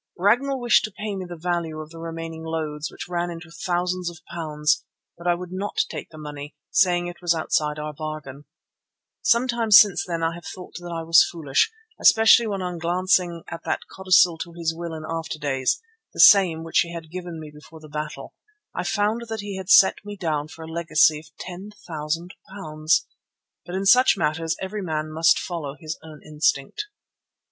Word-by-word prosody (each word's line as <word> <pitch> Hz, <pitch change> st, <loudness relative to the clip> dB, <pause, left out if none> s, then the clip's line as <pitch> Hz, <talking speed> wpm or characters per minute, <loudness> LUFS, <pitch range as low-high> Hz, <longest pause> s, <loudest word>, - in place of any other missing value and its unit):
Ragnall 245 Hz, +9 st, +2 dB
wished 240 Hz, -1 st, +4 dB
to 215 Hz, -, -7 dB
pay 205 Hz, +1 st, -5 dB
me 190 Hz, -1 st, -5 dB
the 175 Hz, -, -7 dB
value 170 Hz, -2 st, -2 dB
of 155 Hz, 0 st, -8 dB
the 165 Hz, -, -10 dB
remaining 165 Hz, 0 st, -6 dB
loads, 155 Hz, -2 st, -3 dB
which -, -, -8 dB
ran 175 Hz, 0 st, -2 dB
into 170 Hz, -1 st, -9 dB
thousands 180 Hz, +1 st, -2 dB
of 170 Hz, -, -11 dB, 0.2 s
pounds, 150 Hz, -3 st, 0 dB, 0.3 s
but 170 Hz, +1 st, -7 dB
I 175 Hz, -, +4 dB
would 180 Hz, 0 st, -8 dB
not 195 Hz, +2 st, -4 dB
take -, -, -6 dB
the 155 Hz, -, -13 dB
money, 150 Hz, -1 st, -8 dB, 0.2 s
saying 175 Hz, -1 st, +3 dB
it 175 Hz, 0 st, -8 dB
was 175 Hz, -1 st, +2 dB
outside 150 Hz, -1 st, 0 dB
our 150 Hz, 0 st, -5 dB
bargain. 150 Hz, -2 st, -7 dB, 0.8 s
Sometimes 235 Hz, -3 st, +5 dB
since 205 Hz, -3 st, +5 dB
then 170 Hz, -2 st, -3 dB
I 165 Hz, 0 st, +1 dB
have 170 Hz, +1 st, -10 dB
thought 180 Hz, -, -11 dB
that 175 Hz, 0 st, -8 dB
I 165 Hz, -1 st, -3 dB
was 165 Hz, +1 st, +7 dB
foolish, 150 Hz, -, +1 dB, 0.3 s
especially 225 Hz, +1 st, +6 dB
when 195 Hz, -3 st, -3 dB
on 180 Hz, -1 st, -4 dB
glancing 175 Hz, 0 st, +1 dB
at 170 Hz, 0 st, -7 dB
that -, -, -1 dB
codicil 180 Hz, -3 st, +4 dB
to 170 Hz, 0 st, -6 dB
his 165 Hz, -1 st, -2 dB
will 170 Hz, -1 st, -5 dB
in 155 Hz, -, -7 dB
after 160 Hz, -1 st, -4 dB
days, 135 Hz, -3 st, 0 dB, 0.4 s
the -, -, -8 dB
same 180 Hz, -, +7 dB
which 165 Hz, -, +1 dB
he 170 Hz, -, +1 dB
had 160 Hz, -2 st, -8 dB
given 175 Hz, -2 st, -6 dB
me 155 Hz, -1 st, -9 dB
before 155 Hz, +2 st, -14 dB
the 155 Hz, -, -13 dB
battle, 150 Hz, 0 st, -6 dB, 0.4 s
I 180 Hz, -, -3 dB
found 215 Hz, +4 st, 0 dB
that 220 Hz, -2 st, -3 dB
he 200 Hz, -1 st, -6 dB
had 190 Hz, 0 st, -7 dB
set 190 Hz, 0 st, +7 dB
me 205 Hz, 0 st, -8 dB
down 155 Hz, -5 st, -1 dB
for 160 Hz, +1 st, -11 dB
a -, -, -10 dB
legacy 160 Hz, -2 st, +3 dB
of 155 Hz, -, -15 dB, 0.2 s
£10,000. 175 Hz, -4 st, -5 dB, 1.4 s
But 175 Hz, -, -5 dB
in 195 Hz, +1 st, -2 dB
such 250 Hz, +6 st, +6 dB
matters 160 Hz, +1 st, 0 dB
every 195 Hz, +2 st, -4 dB
man 155 Hz, -3 st, -3 dB
must 160 Hz, +1 st, +4 dB
follow 155 Hz, -6 st, -4 dB
his 155 Hz, -2 st, -6 dB
own 155 Hz, -2 st, -12 dB
instinct. 150 Hz, -, -1 dB
170 Hz, 190 wpm, -24 LUFS, 155-185 Hz, 1.4 s, was